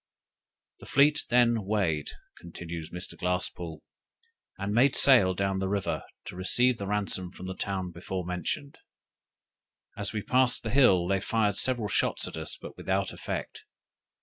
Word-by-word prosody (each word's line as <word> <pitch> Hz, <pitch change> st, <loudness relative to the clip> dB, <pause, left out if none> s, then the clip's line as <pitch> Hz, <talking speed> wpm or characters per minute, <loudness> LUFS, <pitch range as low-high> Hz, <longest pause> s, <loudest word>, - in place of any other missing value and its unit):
"The -, -, -13 dB
fleet 145 Hz, +1 st, +3 dB
then 120 Hz, -2 st, +3 dB
weighed," 95 Hz, -7 st, 0 dB, 0.3 s
continues 85 Hz, -1 st, -7 dB
Mr. 90 Hz, +1 st, -7 dB
Glasspoole, 90 Hz, -2 st, -3 dB, 0.8 s
"and 100 Hz, +1 st, -3 dB
made 130 Hz, +4 st, +4 dB
sail 110 Hz, -9 st, +6 dB
down 95 Hz, 0 st, 0 dB
the 95 Hz, 0 st, -1 dB
river, 100 Hz, -1 st, -1 dB, 0.2 s
to -, -, -8 dB
receive 120 Hz, +7 st, +2 dB
the 100 Hz, -, -4 dB
ransom 100 Hz, -3 st, -1 dB
from 90 Hz, -, -10 dB
the 95 Hz, -, -4 dB
town 95 Hz, -2 st, -3 dB
before 90 Hz, +1 st, -5 dB
mentioned. 90 Hz, -, -4 dB, 1.2 s
As 100 Hz, -1 st, -3 dB
we 110 Hz, -2 st, -3 dB
passed 130 Hz, -1 st, +2 dB
the 115 Hz, -, -3 dB
hill, 95 Hz, -10 st, +5 dB
they 95 Hz, +1 st, +1 dB
fired 105 Hz, -1 st, +1 dB
several 120 Hz, -1 st, +1 dB
shot -, -, 0 dB
at -, -, -7 dB
us, 80 Hz, -1 st, -4 dB
but -, -, -10 dB
without 95 Hz, 0 st, -1 dB
effect. -, -, -5 dB
100 Hz, 150 wpm, -28 LUFS, 90-115 Hz, 1.2 s, sail